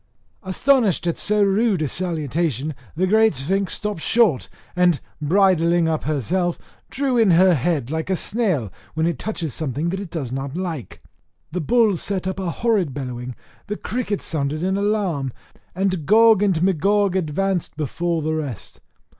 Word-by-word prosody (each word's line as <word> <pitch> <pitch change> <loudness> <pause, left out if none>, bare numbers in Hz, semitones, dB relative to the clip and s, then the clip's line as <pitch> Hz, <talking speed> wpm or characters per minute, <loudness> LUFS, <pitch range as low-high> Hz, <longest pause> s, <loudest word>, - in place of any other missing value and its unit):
Astonished 220 0 +2
at 170 - 0
so 210 0 +1
rude 200 -3 +2
a - - 0
salutation, 155 - -1 0.2
the 180 +4 +1
great 220 0 +4
Sphinx 185 +8 -1
stopped 210 -6 -4
short, 215 - +2 0.3
and 180 -4 +3 0.2
bridling 170 0 +3
up 160 -1 -1
herself, 170 +5 0 0.3
drew 265 -1 0
in 220 -3 +4
her 180 +1 +6
head, 145 -3 -1
like 160 +3 -3
a 190 - +2
snail 180 - 0 0.2
when 160 0 +1
it 170 -4 -1
touches 170 - -4
something 155 +2 -2
that 190 +2 -3
it 200 -3 -6
does 145 -8 -4
not 135 +3 -4
like: 170 -9 -5 0.5
the 180 +2 -2
bulls 215 0 +2
set 190 -2 -2
up 190 +1 -3
a 185 -2 -2
horrid 190 - 0
bellowing, 125 -2 -5 0.3
the 210 0 -3
crickets 220 -4 -3
sounded 155 0 -2
an 190 +1 +1
alarm, 195 -10 0 0.4
and 185 -5 -1
Gog 220 0 +6
and 185 -5 +2
Magog 195 +2 +2
advanced 185 0 -1
before 165 +2 -2
the 155 +1 -1
rest. 145 -9 -5
175 Hz, 160 wpm, -22 LUFS, 155-200 Hz, 0.5 s, her